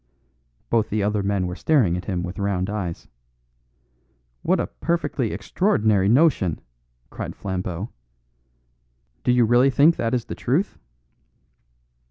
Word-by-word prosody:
Both 110 -2 +2
the 105 0 0
other 105 0 0
men 100 -1 0
were 90 0 -4
staring 120 - +2
at 90 - -5
him 90 -4 -2
with 90 +3 -6
round 100 -1 -1
eyes. 95 -6 -4 1.3
"What - - +1
a - - 0
perfectly 150 -8 -2
extraordinary 105 - +1
notion!" 120 - +3 0.5
cried - - -6
Flambeau. 95 +1 -4 1.3
"Do - - +3
you 125 -1 +4
really 120 +4 +4
think 145 +5 +4
that 115 +2 0
is 120 - -2
the - - -6
truth?" 160 - -1
105 Hz, 130 wpm, -23 LUFS, 95-125 Hz, 1.3 s, you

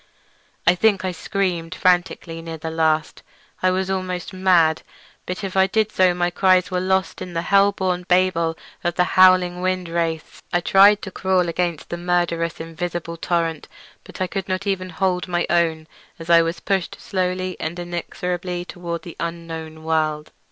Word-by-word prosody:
I 175 - +6
think 195 0 +2
I 185 - 0
screamed 180 -1 -2
frantically 175 -2 +1
near 165 0 -7
the 160 +1 -5
last—I 160 +3 -1
was 190 +1 -1
almost 185 -1 -3
mad—but 180 0 0
if 195 -1 -4
I 190 0 +5
did 215 +1 +1
so 185 -1 +3
my 175 0 0
cries 185 0 +3
were 180 - 0
lost 190 +1 0
in 180 - -6
the 165 0 -2
hell 200 +2 +4
born 180 -2 -2
babel 180 -3 +2 0.3
of 175 0 -1
the 180 - +3
howling 185 -1 +5
wind 185 -1 -1
wraiths. 165 -1 -3
I 175 - +2
tried 200 +3 +5
to 190 - -6
crawl 185 -2 +1
against 170 -2 -2
the 175 - -2
murderous 175 -1 0
invisible 170 +1 -5
torrent, 165 -2 -1 0.4
but - - -12
I 185 - +1
could 195 +1 -5
not 185 +2 -2
even 190 -2 -1
hold 180 +1 -1
my 175 -1 0
own 165 -2 +1 0.3
as 165 +1 -4
I 170 0 +8
was 165 +1 -2
pushed 190 -3 -1
slowly 185 -1 -2
and 160 +2 -4
inexorably 175 +1 -4
toward 170 -2 -6
the 170 - -9
unknown 165 -2 -6
world. 155 -1 -1
175 Hz, 165 wpm, -22 LUFS, 165-185 Hz, 0.4 s, I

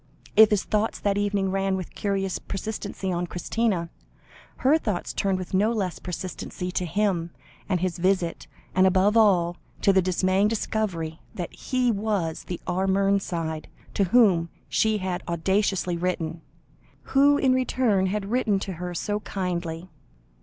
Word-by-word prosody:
If 220 0 +8
his 210 -2 +1
thoughts 215 +1 0
that 200 -1 +1
evening 200 -2 0
ran 195 0 0
with 185 -2 -6
curious 195 -2 -1
persistency 200 -1 -4
on 175 0 -1
Christina, 180 -1 -1 0.7
her 300 +4 +5
thoughts 210 - -3
turned 195 -1 0
with 185 -1 -7
no 205 +4 +3
less 195 -6 -2
persistency 180 0 -5
to 180 -1 -2
him 185 -3 0 0.4
and 180 -3 +1
his 180 -1 -1
visit, 180 -2 0 0.3
and 185 0 +5
above 190 +3 +3
all, 180 -6 +4 0.3
to 195 - +5
the 190 - +5
dismaying 185 +2 +2
discovery 195 -7 -2 0.2
that 175 -3 -5
he 255 -2 0
was 200 -6 -2
the 175 - -5
R. 185 +2 0
Mernside 190 -5 0 0.3
to 200 - +2
whom 185 -5 +4 0.2
she 220 -1 +2
had 185 -2 -3
audaciously 180 +1 0
written, 170 -2 -2 0.7
who 285 +1 +6
in 265 -2 +3
return 250 -6 +2
had 200 +1 -3
written 235 -5 +2
to 195 - -4
her 180 -1 -4
so 205 +5 -1
kindly. 175 -4 -3
190 Hz, 150 wpm, -25 LUFS, 180-210 Hz, 0.7 s, If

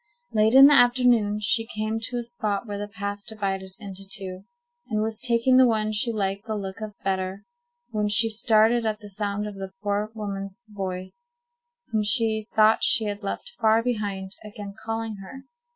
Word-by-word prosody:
Late 220 +2 +3
in 270 +1 +11
the 290 - +8
afternoon 245 -5 +4
she 225 +2 +1
came 215 +1 -1
to 245 - -4
a 240 - -2
spot 220 -3 -3
where 205 -2 -5
the 205 - -4
path 200 0 -5
divided 195 -3 -4
into 195 -2 -8
two, 190 -1 -3 0.4
and 215 -3 -1
was 220 0 -3
taking 240 +2 +3
the 260 -1 +7
one 215 -2 +1
she 215 +3 0
liked 200 0 -2
the 220 - -2
look 195 0 -6
of 215 -1 -6
better, 190 0 -2 0.5
when 210 -1 0
she 225 +2 +5
started 225 +1 +3
at 215 -1 -1
the 205 -1 -11
sound 205 +1 -2
of 210 - -5
the 195 -1 -7
poor 205 +1 -1
woman's 200 +1 -6
voice, 195 - -7 0.6
whom 220 -1 +1
she 220 0 +1
thought 220 0 +5
she 225 - +5
had 205 0 -3
left 210 - -5
far 220 +1 +4
behind, 205 -5 -3
again 205 -1 -8
calling 225 -1 -3
her. 230 +8 -10
215 Hz, 185 wpm, -25 LUFS, 200-225 Hz, 0.6 s, in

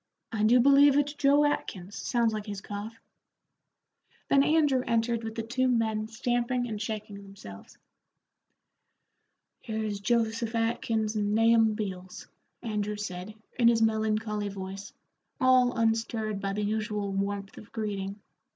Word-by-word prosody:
"I 220 -3 -2
do 230 +4 +5
believe 280 +2 +6
it's 290 0 +1
Joe 290 0 +4
Atkins; 200 -9 -3
sounds 235 -2 0
like 215 0 -5
his 205 -1 -5
cough." 205 +2 -7 1.3
Then 275 - +5
Andrew 295 -4 +3
entered 230 0 0
with 225 0 -5
the 225 - -3
two 255 +3 0
men 220 -3 0
stamping 245 +2 -1
and 215 -2 -5
shaking 215 -2 -5
themselves. 190 - -12 1.8
"Here's 220 -2 -3
Joseph 230 +1 0
Atkins 225 -1 0
and 205 0 0
Nahum 225 -1 +4
Beals," 185 -4 -6 0.4
Andrew 210 -2 -2
said, 195 0 -6 0.2
in 235 - +5
his 230 -1 +4
melancholy 215 -1 0
voice, 195 +1 -7 0.5
all 255 -1 +4
unstirred 225 -2 0
by 195 0 -2
the 210 +1 -2
usual 210 -1 -2
warmth 200 0 -3
of 215 - -15
greeting. 200 -2 -4
220 Hz, 135 wpm, -28 LUFS, 205-235 Hz, 1.8 s, believe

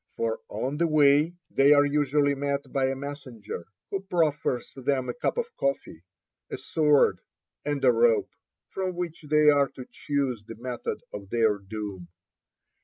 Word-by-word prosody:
For 480 +2 -1
on 145 - -3
the 170 +1 +2
way 150 +2 +4 0.2
they 140 +2 +6
are 145 0 +5
usually 145 0 +2
met 140 0 -3
by 135 -2 +2
a 135 - -1
messenger, 130 - -7 0.2
who 195 - -2
proffers 155 -9 -1
them 130 -1 -1
a - - -1
cup 160 - -2
of 470 -1 -3
coffee, 135 -12 -2 0.5
a - - -4
sword, 150 -3 +3 0.4
and 145 -2 -1
a 125 - +7
rope, 115 -1 +3 0.4
from 185 -2 -3
which 170 -1 -4
they 150 0 +6
are 140 -1 +3
to 130 - -10
choose 135 -7 -2
the 115 +1 -9
method 120 +1 -5
of 100 -2 -8
their 110 -3 +2
doom. 100 -2 -7
140 Hz, 160 wpm, -27 LUFS, 125-150 Hz, 0.5 s, a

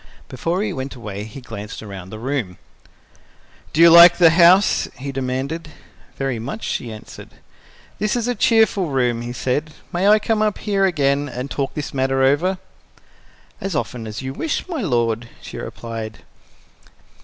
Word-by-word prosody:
Before 170 +9 -2
he - - -2
went 135 0 -5
away, 105 -4 -6
he 110 +5 -10
glanced 110 -3 -8
around 95 -3 -9
the 110 - -8
room. 120 -6 -3 1.1
"Do 160 - +1
you 170 0 +9
like 170 +1 +9
the 170 -3 +7
house?" 175 +4 +5
he 140 +2 -5
demanded. 135 +5 -3 0.5
"Very 135 -4 -2
much," 135 - -6
she 120 - -3
answered. 110 -1 -11 0.7
"This 210 +3 0
is 240 -1 -1
a 245 - +1
cheerful 220 -6 +3
room," 125 -4 0
he 120 0 -5
said. 145 +5 -2 0.2
"May 180 +3 +1
I 210 +1 +7
come 215 0 +1
here 200 -2 +1
again 145 -5 +1
and 125 +2 -6
talk 140 -2 -3
this 150 - -5
matter 135 0 +1
over?" 160 +8 +2 1.0
"As 195 -4 -3
often 125 -6 -3
as 110 +4 -6
you 130 0 -4
wish, 310 - -3
my 330 -6 -3
lord," 120 - 0
she - - -9
replied. 115 -2 -7
135 Hz, 160 wpm, -20 LUFS, 120-175 Hz, 1.1 s, you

